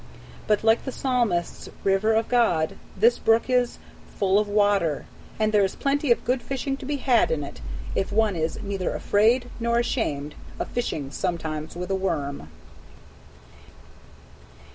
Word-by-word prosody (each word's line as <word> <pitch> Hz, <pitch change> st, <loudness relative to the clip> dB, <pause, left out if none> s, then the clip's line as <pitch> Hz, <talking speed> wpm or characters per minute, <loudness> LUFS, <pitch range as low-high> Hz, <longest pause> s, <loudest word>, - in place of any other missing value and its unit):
But, 210 Hz, -1 st, +2 dB
like 225 Hz, +1 st, +4 dB
the 265 Hz, -, -4 dB
Psalmist's 240 Hz, -11 st, -1 dB
"river 195 Hz, +3 st, +2 dB
of 225 Hz, 0 st, +1 dB
God," 175 Hz, -11 st, +2 dB, 0.2 s
this 230 Hz, +5 st, +4 dB
brook 225 Hz, +3 st, +2 dB
is 250 Hz, -1 st, +2 dB, 0.4 s
"full 195 Hz, 0 st, +3 dB
of 210 Hz, -, 0 dB
water," 205 Hz, -6 st, +2 dB, 0.3 s
and 215 Hz, 0 st, +2 dB
there 210 Hz, -1 st, +4 dB
is 190 Hz, -, -1 dB
plenty 280 Hz, -1 st, 0 dB
of 235 Hz, -, +2 dB
good 250 Hz, +1 st, +1 dB
fishing 270 Hz, +1 st, -3 dB
to 265 Hz, -, -9 dB
be 295 Hz, -, -1 dB
had 255 Hz, -4 st, +3 dB
in 155 Hz, -2 st, -1 dB
it 140 Hz, -, -9 dB, 0.3 s
if 195 Hz, -, -1 dB
one 215 Hz, -1 st, +2 dB
is 160 Hz, 0 st, -2 dB
neither 195 Hz, -2 st, -2 dB
afraid 235 Hz, +4 st, +2 dB
nor 235 Hz, 0 st, +1 dB
ashamed 150 Hz, -, -1 dB, 0.2 s
of -, -, -4 dB
fishing 150 Hz, -, -3 dB
sometimes 160 Hz, -3 st, -3 dB
with 180 Hz, +2 st, -4 dB
a -, -, +2 dB
worm. 145 Hz, -, -3 dB
210 Hz, 155 wpm, -25 LUFS, 175-240 Hz, 0.4 s, like